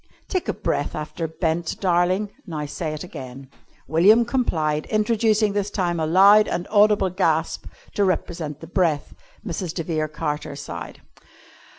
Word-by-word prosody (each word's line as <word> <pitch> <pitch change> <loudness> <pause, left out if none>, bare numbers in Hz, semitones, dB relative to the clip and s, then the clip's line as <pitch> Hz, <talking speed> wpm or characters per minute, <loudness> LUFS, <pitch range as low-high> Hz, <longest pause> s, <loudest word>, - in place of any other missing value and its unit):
"Take 370 -3 -2
a - - +1
breath - - -2
after 160 +2 -4
'bent,' 160 +1 -2
darling. 185 +3 +1 0.2
Now 155 -3 -4
say 155 +2 -4
it 155 - -7
again." 135 -5 -9 0.4
William 200 - +5
complied, 160 - 0
introducing 215 -1 +2
this 205 0 -1
time 175 -4 -1
a 160 - 0
loud 200 +5 +6
and 175 - -3
audible 205 -3 +4
gasp 165 -3 0 0.3
to 205 - +1
represent 170 -5 -2
the 165 - -9
breath. 170 -4 0 0.3
Mrs. 175 -4 -4
de 165 - -2
Vere 155 -2 -1
Carter 150 -1 -4
sighed. 85 -12 -8
175 Hz, 150 wpm, -23 LUFS, 155-205 Hz, 0.4 s, loud